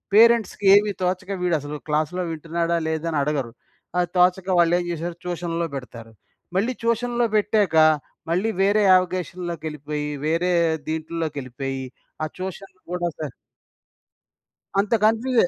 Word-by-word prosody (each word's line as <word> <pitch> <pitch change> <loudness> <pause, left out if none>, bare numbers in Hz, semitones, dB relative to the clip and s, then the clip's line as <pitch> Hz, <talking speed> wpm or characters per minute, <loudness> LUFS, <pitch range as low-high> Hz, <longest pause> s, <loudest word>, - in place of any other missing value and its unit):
పేరెంట్స్‌కి 225 -3 +5
ఏమి 205 0 +4
తోచక, 185 +1 -1
వీడు 175 -2 +2
అసలు 145 +1 -6
క్లాస్‌లో 155 +4 0
వింటున్నాడా, 165 +2 -1
లేదా 160 +1 -2
అని 150 - 0
అడగరు. 140 -6 -2 0.5
అది 175 - +2
తోచక 180 +1 +3
వాళ్ళు 170 0 +4
ఏం 175 - -3
చేసారు 170 +1 -4
ట్యూషన్‌లో 170 -1 -2
పెడతారు. 115 -3 -8 0.5
మళ్ళీ 235 +6 +1
ట్యూషన్‌లో 240 +1 +1
పెట్టాక, 205 -5 +2 0.6
మళ్ళీ 190 +6 +1
వేరే 205 +2 +4
యావిగేషన్‌లోకెళ్ళిపోయి, 165 -5 -1 0.2
వేరే 175 +3 +1 0.4
దీంట్లోకెళ్ళిపోయి 145 -5 -4 0.4
ఆ - - 0
ట్యూషన్‌లు 190 0 -7
కూడా 175 -1 -1
స 150 -5 -4 1.5
అంత 205 +3 +1
కన్‌ఫ్యూజే. 225 -1 +3
175 Hz, 120 wpm, -23 LUFS, 155-195 Hz, 1.5 s, పేరెంట్స్‌కి